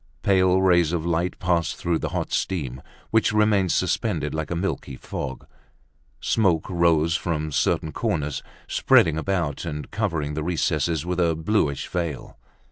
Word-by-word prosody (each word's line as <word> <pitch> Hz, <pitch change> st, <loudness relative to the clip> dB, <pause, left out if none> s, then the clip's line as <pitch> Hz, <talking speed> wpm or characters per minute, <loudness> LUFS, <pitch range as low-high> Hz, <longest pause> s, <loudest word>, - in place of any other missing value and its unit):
Pale 95 Hz, -1 st, +3 dB
rays 85 Hz, -3 st, +4 dB
of 85 Hz, -2 st, -1 dB
light 85 Hz, +1 st, 0 dB
passed 85 Hz, -2 st, 0 dB
through 85 Hz, -1 st, -1 dB
the -, -, -3 dB
hot -, -, -3 dB
steam, 70 Hz, -9 st, -2 dB, 0.3 s
which 110 Hz, 0 st, +3 dB
remained 105 Hz, -4 st, +3 dB
suspended -, -, 0 dB
like 80 Hz, 0 st, -3 dB
a 85 Hz, -, -2 dB
milky 85 Hz, -6 st, -3 dB
fog. 65 Hz, +1 st, -6 dB, 0.7 s
Smoke 95 Hz, -6 st, +1 dB
arose 85 Hz, -2 st, +3 dB
from 80 Hz, -3 st, -2 dB
certain 80 Hz, +2 st, +1 dB
corners, 75 Hz, -1 st, -2 dB, 0.3 s
spreading 80 Hz, -, +4 dB
about 85 Hz, -5 st, -1 dB
and 75 Hz, 0 st, -5 dB
covering 80 Hz, -9 st, -1 dB
the 75 Hz, -, -2 dB
recesses 80 Hz, -2 st, 0 dB
with 90 Hz, 0 st, -2 dB
a 85 Hz, -2 st, +2 dB
bluish 80 Hz, -4 st, 0 dB
veil. 85 Hz, -5 st, -4 dB
85 Hz, 145 wpm, -24 LUFS, 75-90 Hz, 0.7 s, rays